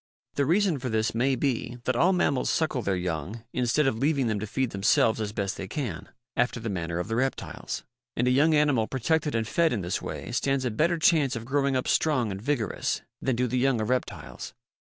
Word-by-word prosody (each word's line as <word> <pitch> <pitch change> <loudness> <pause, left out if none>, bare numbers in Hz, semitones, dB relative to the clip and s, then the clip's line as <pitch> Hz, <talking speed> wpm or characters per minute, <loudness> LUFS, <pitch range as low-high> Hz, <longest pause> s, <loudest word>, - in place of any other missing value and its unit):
The 140 -1 0
reason 180 -2 +2
for 125 - -3
this 110 0 0
may 130 +4 +2
be 125 -2 -1
that 130 - 0
all 175 +10 +4
mammals 145 -8 +1
suckle 155 -5 0
their 100 -3 0
young 90 +5 -4
instead 125 +4 +2
of 115 -4 0
leaving 140 -1 +2
them 110 -3 0
to 110 - -4
feed 130 +3 -1
themselves 110 +3 +2
as 105 -1 -2
best 100 -3 -2
they 95 - -5
can, 105 - -4 0.3
after 125 -1 +1
the 115 -1 -3
manner 85 -2 -3
of 90 - -2
the 110 - -2
reptiles. 130 +3 -3 0.3
And 120 - +1
a - - +4
young 150 +5 +4
animal 145 -7 +3
protected 150 +3 0
and 115 -1 0
fed 165 +5 +2
in 115 - -1
this 90 +1 -2
way - - -6
stands 135 -1 0
a 125 - 0
better 170 +10 +1
chance 155 -5 +3
of 115 0 -5
growing 140 +1 +1
up 130 - -1
strong 130 -9 +2
and 95 0 -5
vigorous 120 -3 -1 0.2
than 130 - 0
do 125 +2 +1
the 125 +1 0
young 130 -2 +2
of 110 - -2
reptiles. 105 -11 -4
125 Hz, 220 wpm, -27 LUFS, 110-140 Hz, 0.3 s, all